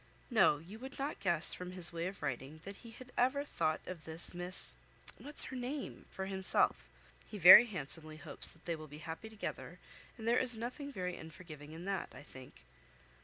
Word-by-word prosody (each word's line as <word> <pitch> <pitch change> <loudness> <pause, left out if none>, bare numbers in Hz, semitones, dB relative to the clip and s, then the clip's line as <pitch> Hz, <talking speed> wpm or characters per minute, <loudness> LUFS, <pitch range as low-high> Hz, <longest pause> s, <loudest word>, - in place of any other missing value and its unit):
No, 220 -10 +4
you 180 +9 -12
would 265 +2 -9
not 280 +2 -4
guess, 175 -4 +5
from 180 0 -8
his 175 -2 0
way 170 +1 -3
of 190 -3 -9
writing, 135 +3 -5
that 200 0 -8
he 235 - -13
had 250 +3 -13
ever 260 +3 +2
thought 155 - -2
of 180 -3 -8
this 160 +3 +3
Miss 175 +1 +3 0.4
(what's 295 +1 -4
her 265 - -8
name?) 260 +3 -6
for 190 - -6
himself. 190 -1 +2 0.4
He 210 - -7
very 190 +6 +10
handsomely 155 -4 -5
hopes 150 - -5
they 165 +1 -5
will 155 -1 -10
be 150 +1 -11
happy 165 +7 -7
together; 220 -2 -7 0.4
and 225 -1 -7
there 240 +1 +3
is 245 -3 +3
nothing 250 +5 -6
very 180 -6 -4
unforgiving 155 -2 -11
in 165 +3 -9
that, 195 -2 -3
I - - -11
think." 130 -3 -14
185 Hz, 190 wpm, -34 LUFS, 160-230 Hz, 0.4 s, very